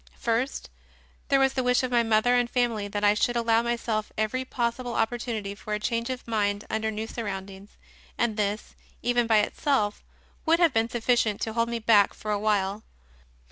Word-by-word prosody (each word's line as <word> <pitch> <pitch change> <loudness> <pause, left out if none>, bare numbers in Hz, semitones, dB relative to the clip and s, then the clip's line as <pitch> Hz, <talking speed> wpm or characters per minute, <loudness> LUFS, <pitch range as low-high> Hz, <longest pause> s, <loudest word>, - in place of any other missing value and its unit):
First, 235 +4 -2 0.6
there 275 - +3
was 270 0 +3
the 260 - 0
wish 250 0 +2
of 255 - -2
my 240 -1 +4
mother 225 +1 +3
and 245 -1 +2
family 235 -5 0
that 205 0 -4
I 205 0 +5
should 240 +3 0
allow 230 -1 +3
myself 235 -2 -2
every 220 +4 -1
possible 245 -1 -2
opportunity 225 -3 -2
for 210 +1 -4
a - - -3
change 230 +2 -2
of 255 -2 -5
mind 205 -2 0
under 220 0 -1
new 220 0 -4
surroundings, 200 -3 -7 0.4
and 235 -2 0
this, 210 0 -2 0.3
even, 240 -1 +2
by 220 -2 +5
itself, 210 -2 -1 0.4
would 330 +1 +4
have 340 -5 +3
been 225 +1 +1
sufficient 235 -3 +1
to 220 - -2
hold 230 0 0
me 235 - -2
back 215 -3 +4
for 215 - -5
a 205 - 0
while. 205 -1 0
225 Hz, 185 wpm, -26 LUFS, 210-240 Hz, 0.6 s, I